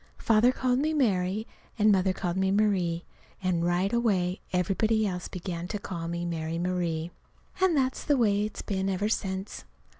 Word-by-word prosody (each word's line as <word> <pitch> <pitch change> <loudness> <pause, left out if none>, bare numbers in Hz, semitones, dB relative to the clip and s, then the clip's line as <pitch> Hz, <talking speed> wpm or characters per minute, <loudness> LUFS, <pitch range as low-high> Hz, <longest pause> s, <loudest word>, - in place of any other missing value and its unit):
Father 230 +2 +4
called 255 -1 +1
me 310 +2 0
Mary, 205 -5 +1 0.3
and 210 -1 +5
Mother 190 -1 +3
called 180 -2 -2
me 190 0 +1
Marie. 190 -5 +1 0.4
And 180 -2 +1
right 175 +4 +1
away 195 -6 +1
everybody 215 +5 +1
else 180 -3 -3
began 175 -1 -5
to 210 - -3
call 170 -4 -5
me 170 +1 -3
Mary 165 -1 -3
Marie. 175 -2 -1 0.5
And 365 -5 +4
that's 260 -1 0
the 290 -2 +2
way 205 -4 +3
it's 215 - -5
been 190 -1 -1
ever 195 +2 0
since. 190 -2 -3
190 Hz, 170 wpm, -28 LUFS, 175-215 Hz, 0.5 s, and